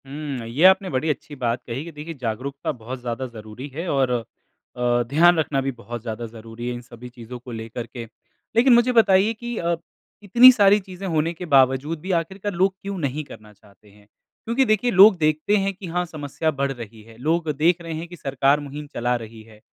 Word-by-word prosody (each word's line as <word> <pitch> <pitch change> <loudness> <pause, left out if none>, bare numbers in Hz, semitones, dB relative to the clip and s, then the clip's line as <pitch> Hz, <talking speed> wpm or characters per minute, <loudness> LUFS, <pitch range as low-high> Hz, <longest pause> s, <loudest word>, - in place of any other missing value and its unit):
हुँ, 140 -4 -5
ये 130 +8 -1
आपने 190 0 +5
बड़ी 135 +2 -1
अच्छी 150 0 -4
बात 120 -2 -2
कही 125 +4 -4
कि 170 - -8
देखिए 155 +2 -8
जागरूकता 130 +5 -3
बहुत 125 -1 -8
ज़्यादा 120 +1 -4
ज़रूरी 110 +2 -9
है 165 +4 -4
और 135 -3 +1
अ, 120 +1 -3
ध्यान 170 +5 +5
रखना 145 -3 0
भी 135 0 -2
बहुत 120 -1 -8
ज़्यादा 115 0 -5
ज़रूरी 115 +1 -9
है 125 - -2
इन 120 - -7
सभी 120 0 -12
चीज़ों 120 0 -10
को 125 +1 -11
लेकर 115 +1 -6
के। 120 +1 -8 0.5
लेकिन 245 +2 +6
मुझे 240 +1 +4
बताइए 215 -2 +4
कि 240 +1 -6
अ, 170 0 0 0.5
इतनी 240 +6 +8
सारी 205 -4 +5
चीज़ें 190 -1 -8
होने 165 -1 0
के 175 +2 -8
बावजूद 135 +1 +3
भी 190 - -4
आखिरकार 190 +4 -6
लोग 190 +2 +2
क्यों 200 0 -5
नहीं 150 -2 -2
करना 110 -6 -14
चाहते 105 0 -23
हैं? 105 0 -22 0.4
क्योंकि 235 +4 +2
देखिए 215 +2 +2
लोग 195 0 +8
देखते 155 +5 +1
हैं 195 0 0
कि 190 -1 -9
हाँ 180 +1 -1
समस्या 155 -1 -3
बढ़ 140 -1 -1
रही 115 -4 -9
है, 115 +1 -16
लोग 160 +5 0
देख 170 +3 +2
रहे 165 -1 -6
हैं 160 +2 -5
कि 175 - -10
सरकार 140 -1 +1
मुहिम 145 +1 -8
चला 120 +1 0
रही 115 -1 -8
है। 110 -1 -18
145 Hz, 210 wpm, -23 LUFS, 120-180 Hz, 0.5 s, इतनी